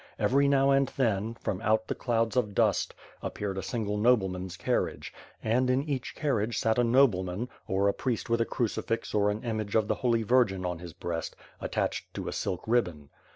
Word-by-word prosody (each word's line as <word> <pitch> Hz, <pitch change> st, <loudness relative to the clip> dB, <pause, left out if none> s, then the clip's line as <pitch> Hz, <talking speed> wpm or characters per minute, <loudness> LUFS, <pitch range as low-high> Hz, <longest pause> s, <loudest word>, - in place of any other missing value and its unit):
Every 140 Hz, +2 st, +3 dB
now 140 Hz, 0 st, +4 dB
and 135 Hz, 0 st, +4 dB
then, 110 Hz, -3 st, +1 dB
from 95 Hz, -4 st, -3 dB
out 110 Hz, 0 st, +1 dB
the -, -, -1 dB
clouds 115 Hz, -1 st, 0 dB
of 105 Hz, -6 st, 0 dB
dust, -, -, +2 dB, 0.3 s
appeared 100 Hz, -2 st, -3 dB
a -, -, -2 dB
single 105 Hz, -4 st, -2 dB
nobleman's 95 Hz, -6 st, +1 dB
carriage, -, -, -1 dB, 0.3 s
and 125 Hz, +3 st, +2 dB
in 130 Hz, +2 st, +2 dB
each 135 Hz, -6 st, -3 dB
carriage 120 Hz, -7 st, 0 dB
sat 110 Hz, +2 st, +2 dB
a -, -, +4 dB
noblema 115 Hz, -8 st, +3 dB
n, 125 Hz, -, -3 dB, 0.2 s
or 95 Hz, +1 st, +2 dB
a 100 Hz, -, +3 dB
priest 125 Hz, -4 st, -2 dB
with 115 Hz, 0 st, +1 dB
a -, -, +2 dB
cru 120 Hz, -, 0 dB
cifix 115 Hz, +1 st, -3 dB
or 105 Hz, -1 st, +3 dB
an 105 Hz, +1 st, -3 dB
image 110 Hz, -4 st, -3 dB
of 110 Hz, -2 st, +3 dB
the -, -, +2 dB
Holy 115 Hz, -2 st, +2 dB
Virgin 105 Hz, -5 st, +2 dB
on 90 Hz, -1 st, -2 dB
his 85 Hz, -1 st, -9 dB
breast, 85 Hz, -1 st, -4 dB, 0.2 s
attached -, -, -2 dB
to -, -, -4 dB
a -, -, -3 dB
silk 90 Hz, -, -2 dB
ribbon. 90 Hz, -12 st, 0 dB
110 Hz, 200 wpm, -29 LUFS, 100-125 Hz, 0.3 s, now